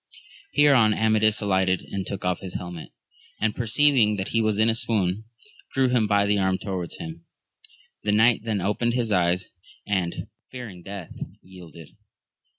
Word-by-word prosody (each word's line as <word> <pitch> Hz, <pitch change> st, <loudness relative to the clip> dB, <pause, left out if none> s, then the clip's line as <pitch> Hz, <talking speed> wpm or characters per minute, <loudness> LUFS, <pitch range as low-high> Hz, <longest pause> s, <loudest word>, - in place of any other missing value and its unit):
Hereon 130 Hz, -8 st, +5 dB
Amadis 110 Hz, 0 st, +2 dB
alighted 95 Hz, -2 st, +1 dB
and 95 Hz, -2 st, -3 dB
took 100 Hz, -2 st, -5 dB
off 90 Hz, -1 st, 0 dB
his 95 Hz, -2 st, -8 dB
helmet, 90 Hz, -2 st, -6 dB, 0.5 s
and 110 Hz, -1 st, 0 dB
perceiving 120 Hz, -2 st, +3 dB
that 95 Hz, -1 st, -3 dB
he 115 Hz, -, +1 dB
was 110 Hz, -2 st, +1 dB
in 110 Hz, +1 st, +4 dB
a 115 Hz, -, +4 dB
swoon, 110 Hz, -4 st, -1 dB, 0.5 s
drew 135 Hz, -1 st, +2 dB
him 120 Hz, -4 st, +2 dB
by 100 Hz, -1 st, +3 dB
the 100 Hz, 0 st, +2 dB
arm 95 Hz, -1 st, +1 dB
towards 95 Hz, -4 st, -5 dB
him; 80 Hz, 0 st, -8 dB, 0.8 s
the 105 Hz, -, 0 dB
knight 110 Hz, +2 st, +4 dB
then 110 Hz, -4 st, -1 dB
opened 115 Hz, +5 st, 0 dB
his 120 Hz, -3 st, 0 dB
%yea^ 90 Hz, -1 st, +2 dB, 0.4 s
and, 95 Hz, -4 st, -2 dB, 0.2 s
fearing 115 Hz, -8 st, -8 dB
death, 95 Hz, -2 st, -8 dB, 0.3 s
yielded. 85 Hz, -4 st, -13 dB
105 Hz, 155 wpm, -25 LUFS, 90-110 Hz, 0.8 s, Hereon